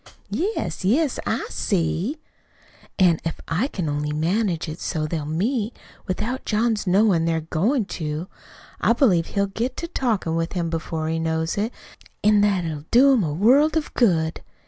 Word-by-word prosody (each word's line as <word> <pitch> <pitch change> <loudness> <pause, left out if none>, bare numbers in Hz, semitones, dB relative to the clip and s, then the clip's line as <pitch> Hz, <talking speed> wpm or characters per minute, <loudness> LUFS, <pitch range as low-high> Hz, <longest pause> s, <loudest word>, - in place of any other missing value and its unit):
"Yes, 400 - -2
I 185 - +2
see, - - +3 0.3
I - - -1
see." 195 - -1 0.8
"An' 175 -4 +4
if 165 - -3
I 180 +11 0
can 185 - -4
only 150 0 -1
manage 170 +2 0
it 155 +2 -6
so 155 -3 -2
they'll 155 -1 -3
meet 215 - -1 0.3
without 215 +7 -2
John's 215 -1 0
knowin' 185 -3 +3
they're 165 -1 0
goin' 205 - 0
to, 155 -1 -4 0.5
I - - +3
believe 195 - +3
he'll 200 -1 0
get 225 +6 -3
to 335 - -4
talkin' 225 - -1
with 165 0 -1
him 170 -3 -2
before 160 -1 -3
he 165 0 -1
knows 160 0 -1
it; 215 +3 -1 0.5
an' 210 -1 +5
that 200 -4 +2
it'll 155 -2 -5
do 270 +4 +6
him 245 - +3
a 155 - -1
world 265 - +4
of 310 - -3
good. 165 -9 +2
185 Hz, 170 wpm, -23 LUFS, 160-225 Hz, 0.8 s, do